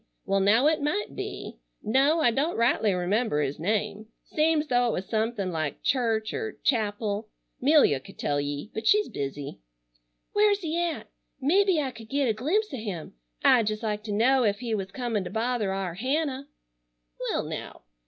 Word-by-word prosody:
Well 195 0 +2
now 210 +7 +4
it 310 0 +3
might 360 +9 -1
be. - - -6 0.2
No, 275 +9 +3
I 240 - +4
don't 290 +8 0
rightly 230 -2 +3
remember 185 0 0
his 140 -1 -1
name. 210 +3 -1 0.2
Seems 310 0 +1
though 245 -2 +3
it 235 - 0
was 185 - -3
something 220 -3 -1
like 155 -3 -3
Church 225 -5 +1
er 440 -1 -4
Chapel. 215 -3 0 0.3
'Melia 275 - +5
could - - -15
tell 145 0 0
ye, 145 +7 -4
but 220 0 -3
she's 420 0 +4
busy." 140 - -5 0.7
"Where's 415 -1 +3
he 325 -2 -2
at? 340 -2 -3 0.3
Mebbe 360 +5 +3
I 260 - -3
could 225 -2 -12
get 275 -1 +1
a 225 - +2
glimpse 325 - 0
o' - - -3
him. 200 -8 -6 0.3
I'd 230 -4 +5
jest 215 +1 -2
like 210 -1 -1
to 215 - -4
know 250 +6 +3
ef 205 -4 +2
he 230 0 -3
was 195 -3 -2
comin' 225 -1 -2
to 180 - -6
bother 230 -3 -1
our 190 -3 -2
Hannah." 270 - -1 0.8
"Well - - 0
now. - - -7
225 Hz, 180 wpm, -27 LUFS, 200-285 Hz, 0.8 s, Melia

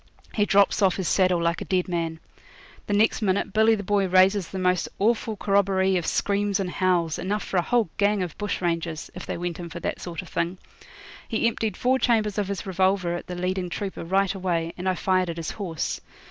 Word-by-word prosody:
He 210 - +2
drops 200 +1 +4
off 190 -2 +4
his 190 -3 -2
saddle 185 -2 +3
like 170 0 0
a - - -4
dead 185 -2 0
man. 165 -2 -2 0.7
The 205 - -1
next 220 +3 +3
minute 195 -1 0
Billy 220 +1 +5
the 205 - -5
Boy 200 0 +1
raises 185 0 +4
the 190 - -6
most 180 -1 +1
awful 220 +1 +1
corroboree 195 -2 +2
of 175 -3 -1
screams 200 0 0
and 185 -2 -2
howls, 175 -4 +1
enough 205 +3 -2
for 190 - -2
a - - +4
whole 235 +4 +1
gang 205 -1 +2
of 175 -4 -6
bush 205 -3 -2
rangers, 165 -2 -2
if 180 - -8
they - - -3
went 175 0 -4
in 170 -1 -6
for 170 - -7
that - - -3
sort 175 +1 -5
of 180 - -13
thing. 170 +2 -2 0.7
He 225 - 0
emptied 220 -3 -2
four 260 +1 +2
chambers 215 -5 +1
of 205 - -1
his 195 -3 -4
revolver 190 -1 +1
at 175 - -5
the 180 - -5
leading 180 0 -2
trooper 195 +1 -4
right 195 +3 +1
away, 170 -3 -2
and 185 +1 -2
I 185 - +1
fired 185 -1 +1
at 165 - -4
his 165 - -4
horse. 175 -7 -3
190 Hz, 220 wpm, -25 LUFS, 175-200 Hz, 0.7 s, Billy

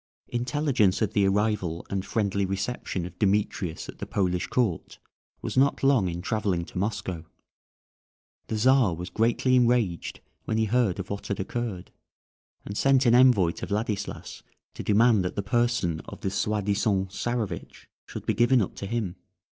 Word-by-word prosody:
Intelligence 120 -5 +1
of 110 0 -1
the 100 -2 +3
arrival 95 -4 0
and 95 -1 -1
friendly 100 -1 0
reception 95 -1 -3
of 90 - -10
Demetrius 100 -4 0
at - - -10
the - - -5
Polish 90 -2 0
court 110 -10 -1 0.5
was - - -4
not 140 +2 +2
long 135 -8 +4
in 85 +1 -5
travelling 100 -6 -1
to 90 - -6
Moscow; 95 -5 -3 1.2
the 110 - -2
Czar 125 -5 +4
was 90 +2 -7
greatly 120 +3 +2
enraged 120 -8 +1 0.3
when 110 - -1
he 110 - +2
heard 110 -4 +1
of 95 0 -6
what 100 - -5
had 100 - -3
occurred, 100 -2 -4 0.7
and 100 - -6
sent 135 +3 +3
an 120 - +5
envoy 120 -9 +5
to - - -7
Vladislas 105 -1 -3 0.3
to - - -7
demand 110 -1 +4
that 90 - -3
the 100 - -2
person 120 -7 +1
of - - -10
the 95 - -2
soi 105 +1 0
disant 100 -1 0
Czarewitch 120 0 -4 0.2
should - - -8
be 110 - +1
given 120 +4 +4
up 100 - -1
to 100 - -5
him. 105 -5 -3
105 Hz, 165 wpm, -26 LUFS, 95-120 Hz, 1.2 s, an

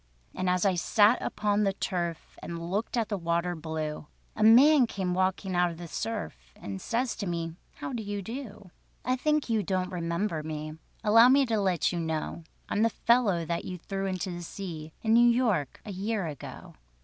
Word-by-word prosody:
And 185 - -1
as 180 +1 +2
I 195 - +4
sat 205 +6 +4
upon 210 0 0
the 195 -1 +2
turf, 175 -4 -3
And 170 0 -6
looked 215 +5 -1
at 225 -3 0
the 205 -3 -2
water 170 +1 0
blue, 155 -1 -4 0.3
A - - -5
man 250 +5 +7
came 185 -4 -2
walking 185 +1 0
out 175 0 +3
of 165 - -8
the 175 0 -7
surf, 160 - -5
And 95 -1 -7
says 240 +1 -1
to 200 - -3
me: 165 -1 -3 0.2
"How 270 - -6
do 235 - -3
you 205 -1 -4
do? 215 -4 -8 0.3
"I 255 - +2
think 300 +3 +1
you 225 -2 +1
don't 185 -1 -1
remember 170 0 -2
me, 155 0 -5 0.3
Allow 225 +3 +7
me 275 +1 +5
to 225 -3 0
let 185 -3 +1
you 175 - -2
know 160 0 -3 0.2
I'm 210 - 0
the 230 - +4
fellow 220 -8 +2
that 170 +1 -2
you 185 - -5
threw 195 +3 -4
into 185 0 -3
the 175 0 -6
sea— 165 -3 -7
In 220 0 +3
New 240 +1 +7
York—a 215 - 0
year 200 +1 -2
ago. 150 -4 -8
190 Hz, 195 wpm, -28 LUFS, 170-220 Hz, 0.3 s, man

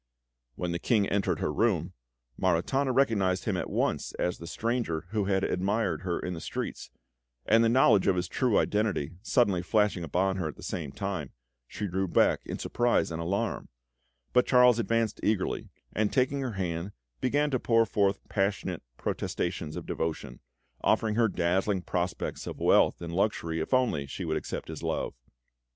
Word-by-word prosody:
When 90 -1 -3
the 85 - -2
King 105 -2 +2
entered 95 -5 0
her - - 0
room, - - +1 0.4
Maritana 95 - +1
recognised 100 -9 +2
him 105 - 0
at 90 - -3
once - - -1
as 90 - -2
the 85 - -8
stranger 115 -6 -2
who 105 -1 0
had 95 -1 +1
admired 95 -3 0
her 90 -2 -2
in 90 - -4
the 80 - -6
streets, - - -5 0.6
and 115 +2 +5
the 115 - +4
knowledge 115 -5 +5
of 95 - +4
his 90 0 -1
true 125 +2 +1
identity 105 -8 +1
suddenly 100 -6 +2
flashing 105 -1 +1
upon 95 +4 0
her 90 -4 -1
at 75 - -6
the - - -13
same 75 -5 -4
time, 95 -4 -4 0.3
she 105 - -5
drew 95 0 -1
back - - +3
in - - -4
surprise 120 -7 +1
and 80 0 -3
alarm; 100 +6 -2 0.6
but 125 0 +4
Charles 125 -2 +6
advanced 115 -2 0
eagerly, 105 -3 0 0.2
and 105 -1 +1
taking 135 +2 +1
her 130 -4 -3
hand, 90 0 -3 0.3
began 145 +3 +1
to 130 - +1
pour 115 -1 +3
forth 100 -2 0
passionate 100 -1 -1 0.2
protestations 85 -3 -3
of - - -6
devotion, 80 -1 -3 0.4
offering 110 -1 +2
her 115 +1 +3
dazzling 95 +1 0
prospects 90 +1 -3
of - - -5
wealth - - +3
and 85 0 -5
luxury 85 -4 0
if 80 - -4
only 125 - +2
she - - -5
would - - -1
accept - - -5
his - - -7
love. - - -2
100 Hz, 170 wpm, -29 LUFS, 90-115 Hz, 0.6 s, Charles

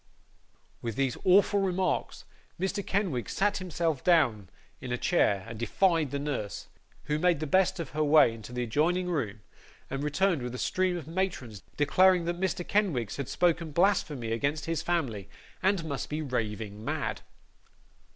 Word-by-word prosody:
With 115 -3 -4
these 135 -3 0
awful 200 +2 +5
remarks, 185 -2 -1 0.3
Mr. 195 +2 -1
Kenwigs 180 - -1
sat 205 +1 +1
himself 170 -6 -2
down 125 - +3 0.3
in 125 - -7
a 125 - 0
chair, 100 - +2
and 115 -1 -8
defied 165 - +2
the 140 - -3
nurse, 140 -8 -4 0.3
who 150 0 -1
made 175 -2 +3
the 155 - -2
best 190 +4 +2
of 165 - -5
her 155 +1 0
way 150 -5 +6
into 115 +1 -10
the 125 0 -2
adjoining 170 +10 +1
room, 115 - -2 0.5
and 135 - -2
returned 165 +1 +1
with 125 0 -5
a - - -4
stream 185 +5 0
of 155 -4 -8
matrons: 160 - -3 0.2
declaring 180 +4 +4
that 175 +1 -2
Mr. 185 -2 -1
Kenwigs 155 - 0
had 140 -3 -4
spoken 170 -2 +1
blasphemy 155 - +1
against 140 +6 -1
his 165 -1 -1
family, 125 - -2 0.3
and 190 -3 +1
must 140 -4 -4
be 155 +1 -2
raving 110 -5 -3
mad. - - -2
155 Hz, 160 wpm, -29 LUFS, 125-180 Hz, 0.5 s, way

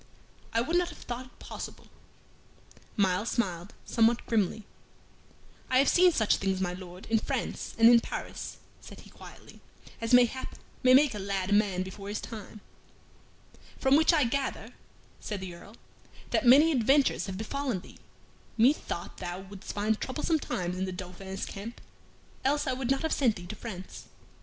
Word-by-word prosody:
"I 230 - +2
would 325 +8 +1
not 355 -1 +1
have - - -11
thought 245 +1 -6
it - - -24
possible." - - -8 1.1
Myles 195 +2 +2
smiled 185 -4 -2
somewhat 230 0 +2
grimly. 220 -2 0 1.0
"I 255 - +3
have 275 - +5
seen 360 0 +6
such 220 -10 +2
things, 190 -1 -1
my 180 -2 -1
Lord, 180 0 -10
in 225 - +4
France - - -3
and 225 0 +7
in 235 0 +8
Paris," - - -6 0.2
said - - -12
he, - - -16
quietly, - - -14 0.4
"as, 230 - -2
mayhap, 250 +1 +3 0.3
may 255 0 +6
make 280 -1 +5
a 210 - -5
lad 195 -1 -2
a - - +4
man 200 -3 +2
before 195 +2 -8
his 210 - -2
time." 215 -1 -9 1.2
"From 265 +1 +4
which 315 +3 +5
I 310 -4 +4
gather," 265 +3 -2 0.5
said 210 -2 -4
the 185 -2 -6
Earl, 200 +6 -13 0.5
"that - - +2
many 290 +6 +8
adventures 270 0 +3
have 190 -1 -5
befallen 245 -1 -2
thee. - - -15 0.6
Methought 220 - +1
thou 175 +1 -5
wouldst 195 0 -9
find 215 +1 0
troublesome 310 +4 0
times 180 -7 -3
in 190 - 0
the 185 - -4
Dauphin's 185 +1 -6
camp, 215 +4 -8 0.6
else 290 +3 +1
I 265 - 0
would 255 -1 -3
not 270 +2 +1
have 320 - 0
sent 240 -6 +2
thee 175 - -9
to 190 - -7
France." 190 -5 -8
220 Hz, 170 wpm, -29 LUFS, 190-260 Hz, 1.2 s, in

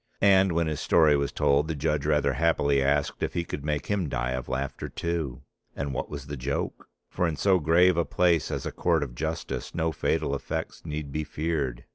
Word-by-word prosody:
And 95 -2 +5
when 85 0 +1
his 75 -2 -2
story 80 -3 +4
was 70 0 0
told 70 +2 +2
the 80 - -2
judge 75 0 -1
rather 75 -2 +2
happily 70 -1 +2
asked 70 +1 +1
if - - -2
he 85 - 0
could 70 - -5
make 75 -1 -1
him 100 -7 -1
die 65 -1 -1
of 65 -1 -4
laughter 65 +1 -3
too. 80 -6 -3 0.3
And 70 -1 -3
what - - -3
was 70 -2 -6
the 75 +1 -5
joke? 70 +1 -3 0.2
For 90 - 0
in 80 - -2
so 95 +4 +3
grave 85 +3 +4
a 85 - +3
place 85 -3 +2
as - - -3
a - - -2
Court 85 -4 +1
of 65 -4 -7
Justice 80 +3 -4
no 80 -1 +1
fatal 70 - 0
effects 70 - -4
need 75 -2 -4
be 75 +2 -2
feared. 75 -5 -2
75 Hz, 210 wpm, -27 LUFS, 70-85 Hz, 0.3 s, And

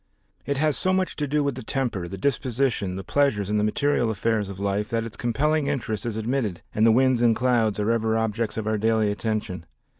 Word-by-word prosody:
It 140 -1 0
has 150 +1 +2
so 185 - +1
much 185 0 0
to 150 - -1
do 150 +1 +1
with 140 -1 0
the 130 - -7
temper, 115 -8 -2
the 95 - -7
disposition 120 -4 0
the 95 - -5
pleasures 105 -5 +1
and 105 - +2
the - - +1
material 120 +2 +1
affairs 110 -1 0
of 100 -1 -8
life 100 +1 -1
that 115 -1 -1
its 115 - -7
compelling 145 +5 0
interest 120 -6 -2
is 110 -2 -3
admitted 110 -5 -2
and 110 +2 +3
the - - +6
winds 130 +1 +3
and 115 -2 +4
clouds 115 -4 +1
are 105 +2 +1
ever 115 -1 +1
objects 110 0 -1
of 110 - -2
our 110 -1 0
daily 110 -1 +2
attention. 105 -5 -3
115 Hz, 220 wpm, -25 LUFS, 105-135 Hz, -, the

